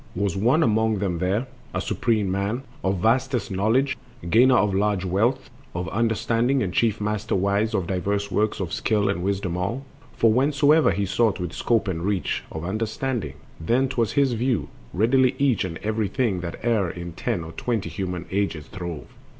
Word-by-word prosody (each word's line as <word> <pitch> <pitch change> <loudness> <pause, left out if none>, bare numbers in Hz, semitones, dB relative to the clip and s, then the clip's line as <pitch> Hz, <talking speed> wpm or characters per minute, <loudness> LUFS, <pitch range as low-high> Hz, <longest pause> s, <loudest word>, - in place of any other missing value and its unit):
Was 100 -1 0
one 120 +11 +3
among 110 -1 +2
them 95 -4 -1
there, 95 +7 0 0.3
a - - +1
supreme 110 -6 0
man 100 +7 -1 0.2
Of 95 -2 0
vastest 125 -1 +1
knowledge, 115 +8 +2 0.4
gainer 125 +3 +6
of 105 -2 +2
large 100 -1 +1
wealth 115 +10 0 0.2
Of 90 0 -2
understanding, 115 +4 +1
and 90 - -3
chief 115 -3 +2
master 105 +1 -1
wise 100 +3 +1
Of 95 - 0
diverse 100 +2 -1
works 105 +3 0
of 90 -4 -3
skill 105 -3 +1
and 100 -3 -1
wisdom 95 -2 -1
all; 115 +10 -2 0.3
For 115 -1 +3
whensoe'er 145 +4 +4
he 100 - 0
sought 110 +2 +1
with 90 -1 -4
scope 115 -3 +1
and 85 -3 -2
reach 100 -1 -1
Of 80 +1 -5
understanding, 110 +5 -2 0.2
then 125 +11 +1
'twas 120 -5 0
his 140 -2 +3
to 120 - -2
view 125 -1 0 0.2
Readily 130 +6 +3
each 135 -5 +2
and 85 -3 -4
every 110 0 0
thing 100 -2 0
that 90 +6 -6
e'er 110 -7 +2
In 85 0 -6
ten 85 0 -2
or 80 - -8
twenty 110 -2 -2
human 90 0 -4
ages 95 -6 -1
throve. 85 -5 -6
105 Hz, 180 wpm, -24 LUFS, 95-120 Hz, 0.4 s, gainer